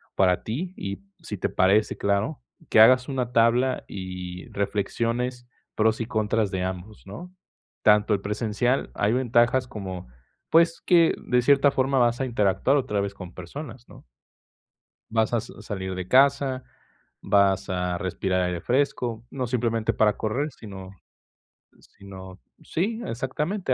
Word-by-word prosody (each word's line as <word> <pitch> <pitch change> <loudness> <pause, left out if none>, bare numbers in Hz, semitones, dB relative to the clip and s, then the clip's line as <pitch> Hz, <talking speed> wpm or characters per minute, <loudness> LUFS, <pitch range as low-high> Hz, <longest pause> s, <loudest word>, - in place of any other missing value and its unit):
para 90 -2 +2
ti 165 +12 -4
y, 100 0 -5 0.2
si - - -6
te - - -1
parece, 100 +3 +2
claro, 100 -9 0 0.3
que - - +4
hagas 125 +4 +6
una 125 -3 -2
tabla 120 +3 +3
y 90 -1 -7
reflexiones 115 +5 -2 0.3
pros 110 +1 +2
y - - -1
contras 110 -2 0
de 95 -1 -2
ambos, 95 +3 -6
¿no? 175 - -9 0.5
Tanto 105 0 +4
el 100 - 0
presencial, 110 +5 -1
hay 105 +2 +1
ventajas 125 0 +2
como, 95 - -7 0.4
pues, 165 0 +4
que 170 -2 +5
de 125 0 +2
cierta 140 +2 +4
forma 135 0 +1
vas 120 +1 +2
a - - +1
interactuar 105 +2 +2
otra 105 -7 -1
vez 100 0 -3
con 90 -3 -10
personas, 120 - -9
¿no? - - -15 1.1
Vas 110 0 +1
a 115 - +2
sa 115 - -12
salir 95 -3 -5
de 90 -1 -5
casa, 135 0 +3 0.6
vas 100 -1 +2
a 90 -1 -1
respirar 95 +1 -1
aire 90 -1 -2
fresco, 120 -2 -1
no 130 -2 -3
simplemente 115 -2 0
para 105 -1 +2
correr, 135 +8 -2
sino 95 -6 -10 0.9
sino 95 -1 -12 0.2
sí, 220 +8 -2
exactamente, 140 - -2
110 Hz, 145 wpm, -25 LUFS, 100-130 Hz, 1.1 s, hagas